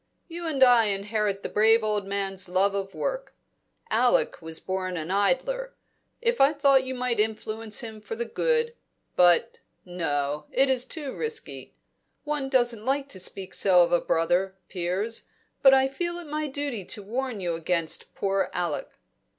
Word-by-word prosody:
You 340 -1 -6
and 280 -4 +3
I 245 -3 +6
inherit 205 0 -1
the - - -2
brave 220 +2 +4
old 210 -2 -1
man's 195 -2 -3
love 190 +2 +2
of 195 -1 -4
work; - - -3 0.6
Alec - - +2
was 160 0 -7
born 185 -1 -3
an 160 +2 -4
idler. 265 - 0 0.5
If 475 0 +1
I 275 +3 +6
thought 275 -2 +4
you 260 0 -4
might 250 -2 -1
influence 215 0 -2
him 220 -2 -8
for 210 +1 -6
good 465 - 0 0.4
but 175 -1 +4 0.3
no, 150 -5 -2
it 270 +1 +3
is 255 -1 +1
too 290 -4 -5
risky. 450 -1 -5 0.5
One 295 -3 -2
doesn't 240 -4 +1
like 275 +3 0
to 190 - -6
speak 185 +1 -4
so 180 -2 +5
of 170 - -1
a 175 - +3
brother, 180 +4 +1
Piers, 190 +5 -2 0.4
but 270 - +8
I 265 0 +5
feel 345 +6 -3
it 350 - -8
my 305 0 -3
duty 280 -6 -3
to 205 - -5
warn 245 +2 -3
you 175 -3 -2
against 165 0 -2
poor 195 0 0
Alec. 175 -4 -2
220 Hz, 165 wpm, -26 LUFS, 190-270 Hz, 0.6 s, but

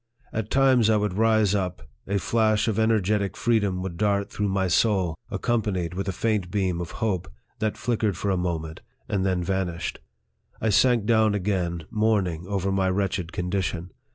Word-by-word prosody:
At 110 -1 -3
times 130 -5 +4
I 110 - +4
would 105 -2 0
rise 110 -1 +3
up, 90 -3 -2 0.2
a 100 +1 0
flash 110 +1 +2
of 110 -1 0
energetic 105 -3 +1
freedom 100 -6 +1
would 90 -3 -5
dart 100 0 0
through 105 - -1
my 95 -1 +1
soul, 95 -1 +2 0.2
accompanied 100 -7 -1
with 95 +2 -3
a - - +1
faint 105 -2 -1
beam 90 -3 -1
of 85 - -5 0.2
hope, 95 -7 -2 0.3
that 110 -1 -1
flickered 110 -6 0
for 100 - -1
a - - +2
moment, 80 -3 -3 0.3
and 100 -3 0
then 95 -2 0
vanished. 90 -2 -2 0.6
I 110 - 0
sank 115 +1 +4
down 110 -2 +3
again, 90 -4 -1
mourning 100 -6 0
over 100 -1 -1
my 95 -1 +1
wretched 95 -3 -1
condition. 90 -1 -2
100 Hz, 170 wpm, -25 LUFS, 90-110 Hz, 0.6 s, times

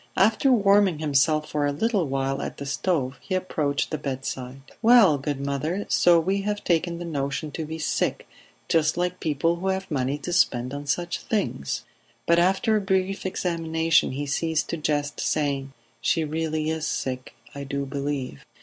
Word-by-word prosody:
After 220 +7 +4
warming 200 -6 +4
himself 150 +1 +2
for 145 -1 0
a - - +1
little 200 +2 0
while 135 0 -1
at - - -5
the 140 - -6
stove 135 -3 -1
he 185 - -3
approached 150 -6 -1
the 155 - -2
bedside. 135 -1 -5 0.2
"Well, 220 - +6
good 140 0 -3
mother, 140 +8 -2
so 175 -1 +5
we 190 +4 0
have 205 +1 -2
taken 170 0 +1
the 175 - -6
notion 145 -1 -3
to 160 - -4
be 160 +1 -5
sick, 155 - -1 0.4
just 160 0 +2
like 180 +1 -1
people 165 +3 0
who 185 +3 -4
have 190 -1 -2
money 135 0 0
to 160 +5 -5
spend 125 -6 +2
on 145 0 -6
such 175 +4 -1
things!" 195 - -2 0.4
But 170 0 +4
after 190 +5 +3
a 210 - +2
brief 190 0 0
examination 165 -4 +1
he 145 +2 -3
ceased 160 +2 -1
to 170 - -2
jest, 150 -1 -1
saying: 140 -3 -1 0.3
"She 165 - +2
really 155 0 -1
is 160 -1 -2
sick, 130 -1 -3 0.2
I 140 - -6
do 140 0 -3
believe." 140 - -4
155 Hz, 175 wpm, -25 LUFS, 140-180 Hz, 0.4 s, Well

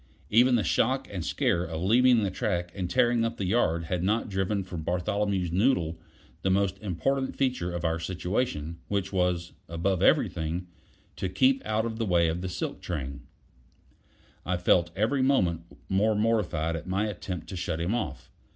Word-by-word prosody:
Even 120 +3 +5
the 110 - +2
shock 75 - +1
and - - -4
scare 85 - +1
of 80 -2 -4
leaving 120 +3 +5
the 100 - 0
track 90 -5 -2
and 90 -3 -3
tearing 120 0 +3
up 115 0 -2
the 100 - -2
yard 90 -5 +1
had 85 +1 -2
not 105 +5 0
driven 95 +1 -1
from 90 -3 -6
Bartholomew's 95 +1 -1
noddle 90 -5 +1 0.4
the 95 - 0
most 100 0 +1
important 130 +8 -1
feature 125 -10 0
of 85 -1 -4
our 80 0 0
situation, 90 -2 -2
which 100 -1 -2
was, 90 -2 0 0.2
above 85 +3 0
everything, 80 +3 +2 0.5
to 95 - -2
keep 130 +8 +3
out 110 +1 +1
of 115 -1 -4
the 115 - 0
way 85 -2 +3
of 85 +2 -2
the 95 - -3
silk 90 - -4
train. 70 -6 -5 1.2
I 90 0 -1
felt 85 0 +3
every 115 +7 +1
moment 90 - +2 0.2
more 105 +3 +2
mortified 105 -7 +1
at 80 - -6
my 95 +3 0
attempt 95 -3 -5
to 95 - -5
shut 85 -2 -2
him 85 +6 0
off. 120 -3 -4
95 Hz, 175 wpm, -28 LUFS, 85-110 Hz, 1.2 s, Even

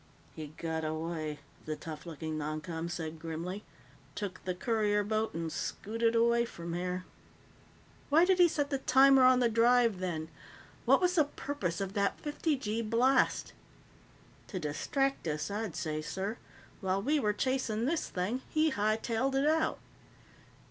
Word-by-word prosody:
"He 155 -1 -6
got 160 -1 -3
away," 155 -1 -3 0.2
the 155 - -2
tough 155 +1 -8
looking 160 -1 -5
noncom 155 +2 -4
said 165 -2 -5
grimly. 170 +5 -5 0.5
"Took 190 -3 -5
the 185 -1 -1
courier 210 0 +1
boat 215 0 -1
and 165 -1 -3
scooted 230 +6 -1
away 235 +1 +4
from 170 -7 -6
here." 180 +1 -3 1.0
"Why 320 +4 +6
did 375 0 +3
he 350 - +8
set 290 -3 -1
the 275 - 0
timer 270 0 +6
on 255 0 +6
the 240 - +5
drive, 230 -2 +4
then? 165 -4 -3 0.6
What - - +5
was 360 -1 +3
the 310 -4 +4
purpose 280 -12 -4
of 195 -1 -3
that 200 -1 0
fifty 300 +1 -1
gee 220 -2 -2
blast?" 235 +4 +2 0.9
"To 195 - -5
distract 225 - -1
us, 155 +4 -2
I'd 210 -4 -3
say, 155 -1 -2
sir. 195 +8 -4 0.4
While 190 0 0
we 300 +3 +2
were 210 -6 +2
chasing 235 -1 -1
this 320 +4 0
thing, 200 +8 -2
he 315 0 +2
hightailed 225 +5 0
it 270 +1 +2
out." 315 +1 +2
210 Hz, 155 wpm, -31 LUFS, 170-255 Hz, 1.0 s, he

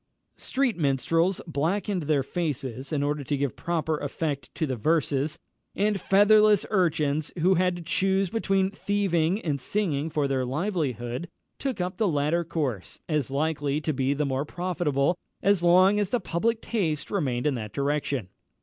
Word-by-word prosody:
Street 260 -5 0
minstrels 165 +5 +1
blackened 180 +5 -1
their 145 -3 +3
faces 135 -4 -3
in 145 -2 0
order 145 0 -1
to 145 +2 -1
give 140 -2 -1
proper 160 -2 -1
effect 145 0 -3
to 160 - 0
the 130 -3 -2
verses; 150 +3 +1 0.4
and 205 -2 +1
fatherless 210 +1 +5
urchins, 155 -6 +1
who 180 +3 +4
had 180 0 +2
to 175 - -7
choose 190 +2 +1
between 195 -3 +1
thieving 195 -3 0
and 145 -5 -2
singing 160 -3 -1
for 150 -2 0
their 135 -1 0
livelihood, 135 - -2 0.3
took 270 -3 -2 0.2
the 220 - +2
latter 155 +1 +1
course, 140 - -3
as 150 -5 0
likely 145 0 0
to 155 0 -2
be 135 +1 0
the 150 +1 0
more 135 0 -1
profitable, 175 -2 -1 0.2
as 200 -2 +3
long 185 +4 +5
as 205 -3 0
the 245 - +1
public 225 +5 -1
taste 165 -10 -2
remained 135 -10 -1
in 150 - +2
that 110 -4 -5
direction. 140 -3 -1
160 Hz, 160 wpm, -26 LUFS, 140-190 Hz, 0.4 s, fatherless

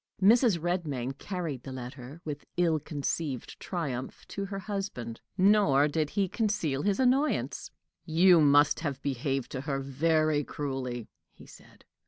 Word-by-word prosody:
Mrs. 220 0 +5
Redmain 155 -7 -2
carried 170 -9 -4
the 135 - -8
letter, 130 +3 -8
with 150 -2 -5
ill 165 -3 +3
concealed 145 -2 -3
triumph, 135 -8 -4
to 200 - -4
her 195 0 -5
husband; 195 - -5 0.2
nor 185 -8 +5
did 150 0 -1
he 195 +2 0
conceal 185 - -1
his 200 - +1
annoyance. 265 +4 +1 0.3
"You 170 +1 +5
must 145 0 +5
have 145 -5 -3
behaved 135 -1 -2
to 130 - -4
her 140 -1 -2
very 155 +2 +1
cruelly," 130 -5 -4 0.3
he - - -15
said. - - -17
150 Hz, 140 wpm, -29 LUFS, 135-185 Hz, 0.3 s, Mrs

